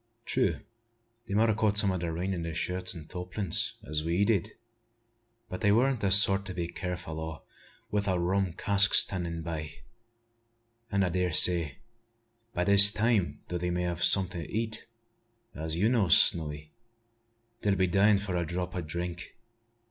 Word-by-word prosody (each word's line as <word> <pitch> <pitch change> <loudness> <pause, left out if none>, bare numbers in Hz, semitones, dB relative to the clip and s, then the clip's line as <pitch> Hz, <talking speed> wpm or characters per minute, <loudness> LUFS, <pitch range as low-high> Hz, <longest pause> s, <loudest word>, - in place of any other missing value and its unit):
True, 130 -1 -1 0.7
they 100 - -4
mout 110 +1 +2
a - - 0
caught 105 -1 -1
some 100 -2 +3
o' 95 - -3
the 85 -1 -4
rain 90 +4 -4
in 85 - -5
their 85 -1 -6
shirts 90 +2 -4
and 80 -2 -11
tarpaulins, 90 +1 -4
as 75 +2 -3
we 85 +5 0
did; 100 -6 -1 0.9
but 90 - -8
they 105 -2 +2
weren't 125 +3 +1
the 100 -2 -1
sort 100 0 +6
to 90 - -8
be 85 -1 -4
careful 90 -3 -7
o' 80 0 -6 0.6
it 105 - 0
wi' - - +1
a 90 - -1
rum 90 +1 -2
cask 100 +3 +6
standin' 85 -3 +1
by; 80 -2 -6 1.2
an' 100 -1 0
I 90 - -1
dar 90 0 -2
say, 80 -3 +4 0.7
by 90 - -2
this 100 +1 +9
time, 110 -4 -1
though 90 - -5
they 90 0 -3
may 90 0 -3
have 85 -1 -4
some'at 95 -2 +2
to 85 -3 -8
eat, 110 0 -5 0.7
as 80 +1 -3
you 95 +6 0
knows, 110 -9 +3
Snowy, 75 -2 -1 0.9
they'll 100 -1 0
be 95 -1 +1
dyin' 100 +3 +2
for 100 -2 -5
a 85 - -1
drop 90 +2 -6
o' 90 - -3
drink. 85 +4 -7
90 Hz, 180 wpm, -27 LUFS, 85-100 Hz, 1.2 s, this